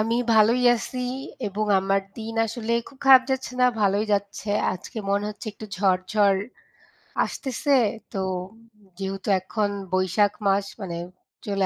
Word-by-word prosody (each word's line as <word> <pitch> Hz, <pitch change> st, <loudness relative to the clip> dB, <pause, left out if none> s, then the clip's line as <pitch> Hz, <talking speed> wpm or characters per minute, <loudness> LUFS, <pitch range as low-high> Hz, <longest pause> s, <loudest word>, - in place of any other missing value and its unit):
আমি 225 Hz, +2 st, +1 dB, 0.2 s
ভালোই 225 Hz, +3 st, +5 dB
আছি 255 Hz, +2 st, -6 dB, 0.5 s
এবং 210 Hz, +2 st, -2 dB, 0.2 s
আমার 195 Hz, +1 st, +1 dB, 0.2 s
দিন 225 Hz, 0 st, -6 dB
আসলে 230 Hz, +1 st, -3 dB, 0.2 s
খুব 270 Hz, -, -19 dB
খারাপ 265 Hz, -1 st, +9 dB
যাচ্ছে 265 Hz, -1 st, -2 dB
না, 250 Hz, -, +6 dB
ভালোই 200 Hz, +1 st, +2 dB
যাচ্ছে। 200 Hz, +1 st, -2 dB, 0.2 s
আজকে 185 Hz, +5 st, -8 dB
মনে 200 Hz, +1 st, +1 dB
হচ্ছে 210 Hz, -, -10 dB
একটু 215 Hz, +1 st, -10 dB
ঝড়, 185 Hz, -1 st, +2 dB
ঝড় 200 Hz, -2 st, +4 dB, 0.9 s
আসতেছে। 275 Hz, +1 st, 0 dB, 0.4 s
তো 195 Hz, -, -1 dB, 0.8 s
যেহেতু 195 Hz, +1 st, -4 dB
এখন 205 Hz, +2 st, -1 dB, 0.2 s
বৈশাখ 185 Hz, +2 st, +2 dB
মাস, 195 Hz, 0 st, +2 dB, 0.2 s
মানে 175 Hz, -3 st, -4 dB, 0.5 s
চলে 195 Hz, -2 st, 0 dB
205 Hz, 140 wpm, -24 LUFS, 195-225 Hz, 0.9 s, খারাপ